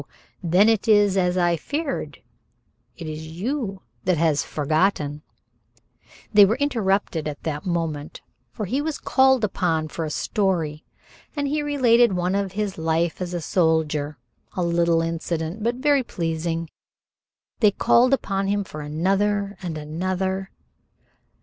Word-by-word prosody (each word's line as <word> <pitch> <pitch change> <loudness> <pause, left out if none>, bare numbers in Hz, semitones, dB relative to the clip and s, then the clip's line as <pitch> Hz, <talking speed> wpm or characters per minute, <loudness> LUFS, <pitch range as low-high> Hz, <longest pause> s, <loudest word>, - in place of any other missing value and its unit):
Then 180 +4 +4
it 225 -2 +2
is 205 -3 +5
as 180 -1 +1
I 175 -1 +3
feared. 290 - -4 0.7
It 170 - -7
is 155 0 -6
you 195 - -4 0.2
who - - +2
have 160 -3 +2
forgotten." 150 -1 0 1.1
They 205 -1 +9
were 205 +3 +4
interrupted 205 - 0
at 150 -1 -6
that 155 +1 -4
moment, 165 -4 -3 0.3
for 215 - -4
he 260 +9 -1
was 310 0 -2
called 265 -2 +3
upon 165 -6 0
for 165 - -4
a 155 - -3
story, 165 -4 -1 0.5
and 285 -1 -1
he 300 +2 0
related 245 -6 +4
one 180 +1 0
of 195 -1 -1
his 200 -3 -3
life 165 +2 0
as 180 -1 -3
a 175 - -2
soldier, 155 -4 +1 0.4
a 180 - -1
little 170 -1 +2
incident, 165 +3 -3
but 235 +3 0
everything 285 -3 +4
pleased. 165 -2 -3 0.9
They 215 - +6
called 240 +5 +3
upon 195 -7 0
him 205 +1 +1
for 155 -5 -8
another 195 +6 0
and 170 -4 -4
another. 185 +5 -2
185 Hz, 140 wpm, -23 LUFS, 160-210 Hz, 1.1 s, They